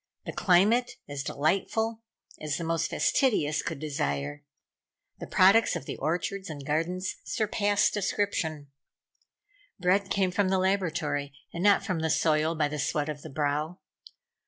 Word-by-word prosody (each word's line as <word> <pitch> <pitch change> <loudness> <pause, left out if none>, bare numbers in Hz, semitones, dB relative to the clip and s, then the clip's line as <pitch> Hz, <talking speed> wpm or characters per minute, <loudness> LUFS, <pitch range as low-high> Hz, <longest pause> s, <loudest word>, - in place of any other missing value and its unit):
The - - -5
climate 215 +7 +3
as 145 -1 -4
delightful 220 +11 0 0.4
as 150 -1 -2
the 170 - -4
most 165 0 0
fastidious 155 - +2
could - - -4
desire. 75 - -3 0.8
The - - -7
products 195 +5 +5
of - - -5
the - - -5
orchards 175 +5 -2
and 145 -3 -7
gardens 175 +5 -1
surpassed 205 -1 +1
description. 170 -8 -1 1.1
Bread 190 +2 +2
came 190 -2 +1
from 190 +1 +1
the 190 - +2
laboratory, 165 -7 -1 0.2
and 170 - -4
not 205 -1 +4
from 180 -3 -1
the 160 0 0
soil 155 +1 +2
by 155 -2 +1
the 150 0 -5
sweat 145 +1 -1
of 145 -1 -5
the 160 - -9
brow. 150 +4 -1
165 Hz, 145 wpm, -28 LUFS, 150-195 Hz, 1.1 s, products